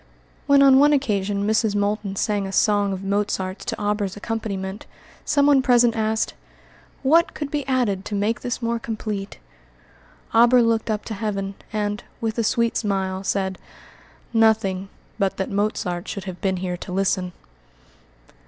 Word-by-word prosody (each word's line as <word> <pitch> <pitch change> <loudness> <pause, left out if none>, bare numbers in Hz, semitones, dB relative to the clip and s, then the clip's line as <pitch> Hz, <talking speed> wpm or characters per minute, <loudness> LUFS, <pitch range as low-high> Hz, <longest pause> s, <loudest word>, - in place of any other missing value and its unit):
When, 280 -1 +6
on 270 -1 +7
one 295 +1 +5
occasion, 205 -7 0
Mrs. 220 -1 +1
Moulton 205 -1 -1
sang 205 -1 0
a - - -6
song 205 0 +2
of 190 0 -4
Mozart's 195 -1 -2
to - - -3
Auber's 205 -2 -1
accompaniment, 205 -2 -4 0.4
someone 285 -1 +4
present 245 -3 +4
asked, 220 0 0 0.7
"What 330 +5 +3
could 290 -2 -5
be 290 -3 -2
added 240 -8 0
to 210 - -4
make 210 +3 0
this 245 0 -4
more 230 0 0
complete?" 215 -3 -5 1.0
Auber 240 +2 +6
looked 230 0 +1
up 215 -1 -2
to 225 - -5
heaven, 200 -2 -3 0.2
and, 210 -1 -2 0.2
with 225 0 -2
a - - +2
sweet 235 +1 +1
smile, 190 -3 -1
said, 190 -1 -1 0.7
"Nothing 215 -4 +2 0.3
but 195 -1 0
that 190 - -3
Mozart 195 -3 -1
should 200 - -5
have 185 -1 -8
been 190 -1 0
here 180 -1 -3
to 180 - -8
listen." 185 -1 0
210 Hz, 155 wpm, -23 LUFS, 195-230 Hz, 1.0 s, on